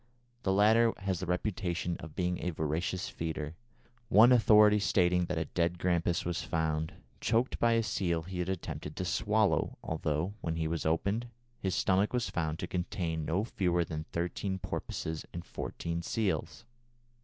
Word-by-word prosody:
The 95 - +1
latter 110 +4 +5
has 95 -3 -2
the 95 - -4
reputation 90 -1 -1
of 80 -3 -9
being 90 -1 0
a 90 - -1
voracious 80 +3 -2
feeder, 80 -2 -4 0.6
one 115 +3 +7
authority 105 -3 +6
stating 90 -3 +3
that 90 -1 -3
a 80 - 0
dead 85 0 0
grampus 85 -1 +1
was 85 0 -1
found, 80 -1 -1 0.3
choked 115 +3 +1
by 115 0 +4
a 115 0 +3
seal 85 -6 0
he 90 +1 -6
had 90 +1 -1
attempted 75 -5 -4
to 90 - -3
swallow, 105 +4 +1
although, 80 +3 -1
when 80 -1 -2
he 80 -1 -1
was 80 0 -1
opened, 100 +9 0 0.3
his 95 -5 -1
stomach 95 +4 +2
was 120 -2 0
found 80 -2 -1
to - - -4
contain 85 -3 -2
no 90 +7 +1
fewer 90 -6 0
than 80 -1 -5
thirteen 90 +3 -2
porpoises 80 -3 -4
and 85 - -5
fourteen 85 0 -4
seals. 85 -4 -2
90 Hz, 165 wpm, -31 LUFS, 80-100 Hz, 0.6 s, one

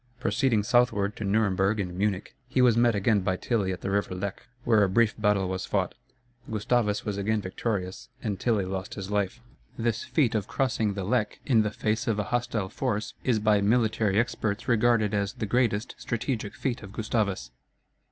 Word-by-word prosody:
Proceeding 115 -6 +1
southward 105 -3 +2
to - - -4
Nuremberg 100 0 +2
and 90 -3 -3
Munich, 100 0 -1
he 130 +1 -1
was 125 -3 +5
met 120 -1 +4
again 100 +1 +3
by 95 -1 0
Tilly 105 -5 0
at 90 - -5
the 95 - -2
river 100 -2 0
Lech, 100 +5 -5 0.2
where 110 -3 +4
a 100 - +2
brief 110 +3 +3
battle 105 -3 +2
was 95 0 -3
fought; 95 -3 0 0.6
Gustavus 110 0 0
was 100 -2 -2
again 110 +2 +1
victorious 95 -1 -3
and 105 -4 -3
Tilly 110 -5 +1
lost 95 0 -4
his 100 -1 -6
life. 105 +3 -1 0.4
This 115 -1 -1
feat 140 -8 +1
of 105 -3 -1
crossing 115 -6 0
the 100 - -3
Lech 110 +2 0
in 120 -6 +4
the 105 - 0
face 110 +4 -1
of 110 -2 +1
a 105 - 0
hostile 115 -5 -1
force 105 -5 -2
is 125 -4 +2
by 105 -1 +3
military 110 -1 +2
experts 110 -2 -1
regarded 115 -3 +3
as 100 +1 0
the 120 -3 -4
greatest 115 -1 +1
strategic 115 -2 -3
feat 125 -3 -2
of 100 -3 -10
Gustavus. 105 - -1
105 Hz, 185 wpm, -27 LUFS, 100-115 Hz, 0.6 s, was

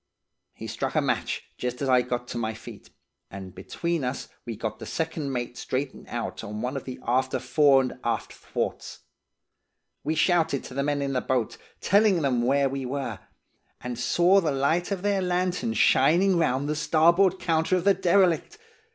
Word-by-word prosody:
"He - - -9
struck - - -3
a - - +4
match, - - -1 0.2
just 125 0 -3
as 140 - -2
I 130 -1 +5
got 125 0 -4
to - - -4
my 110 -1 -2
feet, 110 - -12 0.4
and 95 -1 -9
between 170 - -3
us 125 +1 -4 0.2
we 115 - -4
got 110 +1 -5
the - - -8
second 160 -3 -3
mate 120 -1 -4
straightened 135 +1 -4
out 120 -1 -5
on 105 -1 -5
one 125 +3 -2
of 135 - -5
the 130 - -6
after 130 +2 +1
fore 135 +2 +4
and 125 - -5
aft 120 - -2
thwarts. - - -5 1.0
We 155 +2 -1
shouted 160 -4 +2
to - - -9
the 140 - -1
men 145 0 0
in 135 0 -2
the 125 - 0
boat, 125 -4 -1 0.3
telling 200 -4 +3
them 125 -4 +1
where 135 +3 +2
we 135 0 -4
were, 135 +2 -4 0.6
and 125 -1 -6
saw 175 +10 +4
the 160 -4 0
light 140 +6 +1
of 195 -2 -3
their 200 -1 +1
lantern 180 -9 -1
shining 170 - +4
round 140 -4 +1
the 150 - -1
starboard 170 +5 +3
counter 165 +1 +1
of 180 - 0
the 200 +1 +5
derelict. 185 - +2
140 Hz, 185 wpm, -26 LUFS, 125-170 Hz, 1.0 s, I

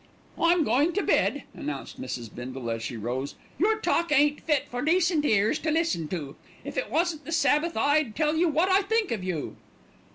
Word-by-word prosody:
"I'm 335 0 +4
goin' 285 +7 +2
to 405 - 0
bed," 290 - +1
announced 145 -2 -6
Mrs. 120 -3 -6
Bindle, 125 -1 -5
as 115 0 -3
she 115 +1 -5
rose. 125 +6 -4 0.2
"Your 430 +5 +3
talk 340 -6 0
ain't 295 0 +3
fit 295 -4 +1
for 245 0 -4
decent 335 0 +2
ears 215 -4 +2
to 315 - -2
listen 310 - 0
to. 150 -5 -5 0.3
If - - -6
it - - -2
wasn't 325 -2 0
the - - -8
Sabbath 320 -2 +2
I'd 285 -1 +2
tell 305 0 +1
you 335 +1 +3
wot 320 +4 +2
I 380 +1 +4
think 440 +1 0
of 215 -5 -2
you." 180 -5 -4
295 Hz, 195 wpm, -27 LUFS, -, 0.3 s, I'm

